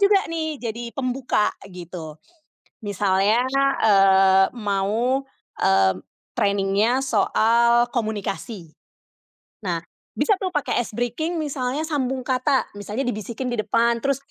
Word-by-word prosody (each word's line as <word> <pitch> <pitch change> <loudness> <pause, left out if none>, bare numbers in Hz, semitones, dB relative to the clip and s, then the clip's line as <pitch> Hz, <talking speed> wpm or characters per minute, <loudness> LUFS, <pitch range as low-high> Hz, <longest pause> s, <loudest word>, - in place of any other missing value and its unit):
juga 400 -1 +4
nih 315 -2 -3
jadi 235 0 -5
pembuka 255 -4 0 0.2
gitu 170 -4 -9 0.7
misalnya, 205 +4 +1 0.4
eee, 195 -1 +5
mau, 215 +6 0 0.4
eee, 95 -1 +4 0.4
training-nya 205 +2 +1
soal 235 0 +3
komunikasi. 205 -5 -4 0.9
Nah 170 -2 -1 0.3
bisa 430 - +2
tuh 375 - -1
pakai 295 - 0
ice 220 - -5
breaking 315 +9 -2
misalnya 270 0 -2
sambung 265 -4 -2
kata, 260 +1 +1
misalnya 210 +6 -3
dibisikin 235 +2 -4
di 235 - -3
depan, 235 +2 +1
terus 275 +2 +1
235 Hz, 110 wpm, -23 LUFS, 195-260 Hz, 0.9 s, eee